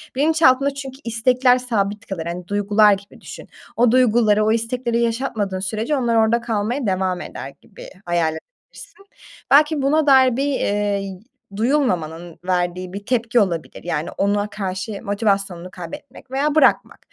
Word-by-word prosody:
bilinçaltında 280 -2 +3
çünkü 270 -1 -8
istekler 250 +2 +2
sabit 215 -4 -2
kalır, 175 -5 -5
hani, 175 +1 -6
duygular 205 +1 +3
gibi 200 +1 -8
düşün. - - -11 0.3
O 240 -1 +3
duyguları, 225 -4 +3
o 215 - +2
istekleri 235 +1 -1
yaşatmadığın 225 -5 -2
sürece 215 +9 -2
onlar 240 -3 0
orada 225 +1 +3
kalmaya 230 +2 -2
devam 185 -1 -1
eder 135 - -8
gibi 200 - -13 0.2
hayal 170 -2 0
edebilirsin. 395 - -14 0.5
Belki 300 +1 +5
buna 300 +2 +2
dair 260 -3 +5
bir, 275 - 0 0.5
iii, 195 -2 -7 0.4
duyulmamanın 175 - -1
verdiği 180 0 -1
bir 200 0 -7
tepki 240 -1 +1
olabilir. 175 -6 -2
Yani, 165 -2 -3
ona 205 +1 0
karşı 195 0 -5
motivasyonunu 195 -4 -1
kaybetmek 185 +9 -10
veya 285 +3 0
bırakmak. 290 -4 +3
220 Hz, 140 wpm, -20 LUFS, 190-255 Hz, 0.5 s, Belki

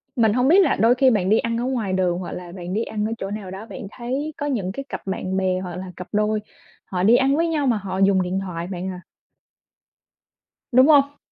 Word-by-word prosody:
Mình 225 -4 +3
hông 250 +2 +2
biết 350 +7 +6
là - - +2
đôi 230 +4 +4
khi 260 +1 +4
bạn 200 -6 +1
đi 215 - +5
ăn 230 0 -1
ở 235 - -2
ngoài 240 -7 -1
đường 180 -2 +1
hoặc 185 - -6
là 175 -1 -7
bạn 180 0 -6
đi 220 +3 0
ăn 210 -2 -3
ở 220 - -2
chỗ 195 -2 -5
nào 205 -3 -6
đó 195 +3 -7
bạn 230 -2 -8
thấy 265 +6 -4
có 290 - -3
những 220 -10 -1
cái 275 +8 -6
cặp - - -5
bạn 190 0 -2
bè 185 -1 +1
hoặc 180 -2 -6
là 185 0 -7
cặp 180 - -7
đôi 210 0 +1 0.5
họ 180 -1 -2
đi 220 +5 +6
ăn 270 +2 +3
với 335 +2 +1
nhau 305 -4 0
mà 235 -3 +2
họ 190 -2 -5
dùng 195 -1 +4
điện 185 +1 -1
thoại 175 -3 -5
bạn 185 0 -4
à. 180 -1 -7 1.7
Đúng 255 +2 +6
hông? 285 -2 +4
210 Hz, 250 wpm, -22 LUFS, 185-250 Hz, 1.7 s, biết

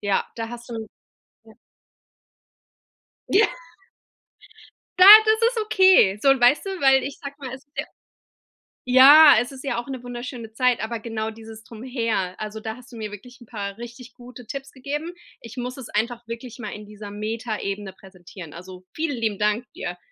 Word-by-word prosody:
Ja, 200 -2 0
da 225 -1 -4
hast 240 +1 -10
du 225 -1 -6 0.6
Ja. - - -17 1.8
Ja. 420 +2 +4 1.5
Ja, 365 - +8 0.2
das 440 +1 +3
ist 480 -2 -3
okay. 375 - +4
So, 275 - +5
und 270 -1 +3
weißt 245 +5 +4
du, 390 - -4
weil 270 -1 +4
ich 280 - -6
sag 280 0 -8
mal, 265 -3 -7
es 265 - -13
ist 285 - -51
ja - - -1 1.0
Ja, 280 +4 +8
es 245 +3 -5
ist 265 0 -11
ja 245 -4 -2
auch 240 - -5
'ne 260 -2 -6
wunderschöne 245 -2 -8
Zeit, 250 +1 +1
aber 230 +1 -4
genau 220 -1 -4
dieses 220 0 -12
Drumherum. 230 -5 -3
Also, 215 0 -6
da 220 +1 -6
hast 250 0 -17
du - - -10
mir 215 -2 -6
wirklich 245 +4 -12
'n 240 - -15
paar 200 -3 -6
richtig 240 +1 -11
gute 245 -1 -13
Tipps 275 +3 -7
gegeben. 295 +5 -5 0.3
Ich 230 +1 -11
muss 250 +1 -5
es 265 -4 -10
einfach 235 +2 -2
wirklich 230 +1 -8
mal 215 -4 -6
in 210 0 -9
dieser 210 0 -10
Metaebene 210 -2 -5
präsentieren. 185 -4 -13
Also, 185 +1 -11
vielen 310 -3 -2
lieben 220 -3 -2
Dank 210 +3 0
dir. 180 0 -6
235 Hz, 180 wpm, -23 LUFS, 215-260 Hz, 1.8 s, Ja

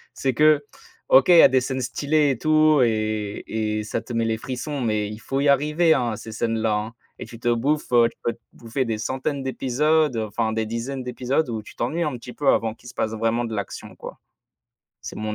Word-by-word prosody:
c'est 130 -2 -1
que, 150 +1 +4 0.4
OK, 130 0 +6
il 175 - +8
y - - +10
a - - +10
des 130 0 +2
scènes 130 0 -3
stylées 145 +3 +1
et 125 - -2
tout 155 -2 +4
et 110 -2 -1
et 110 -1 -2
ça 115 +2 -3
te 115 - -11
met 115 0 0
les 110 -1 0
frissons 130 +4 -5
mais 105 -3 0
il 105 +1 -8
faut 135 +3 -3
y 140 0 +2
arriver, 150 +4 +3
hein, 120 -2 0
à - - -4
ces 110 - -9
scènes-là, 110 -1 -1
hein 105 +2 -3 0.3
et - - -5
tu 115 - -11
te 120 +1 -1
bouffes, 140 +5 0
heu, 120 -1 +5
tu - - -24
peux 120 - +1
te - - -14
bouffer 120 +3 -3
des 110 -2 -2
centaines 135 +4 -3
d'épisodes, 145 +2 +1
enfin, 110 0 -2
des 110 0 -1
dizaines 120 +4 -4
d'épisodes 125 +3 -1
où 110 -2 -3
tu - - -14
t'ennuies 155 +9 -1
un 150 -4 -2
petit 125 +1 -10
peu 145 +1 -4
avant 110 -3 +3
qu'il 120 - -17
se 120 - -10
passe 110 - -2
vraiment 115 +2 0
de 115 - -4
l'action, 100 -2 -6
quoi. - - -10 0.8
C'est - - -8
mon 110 0 -3
120 Hz, 235 wpm, -23 LUFS, 110-140 Hz, 0.8 s, y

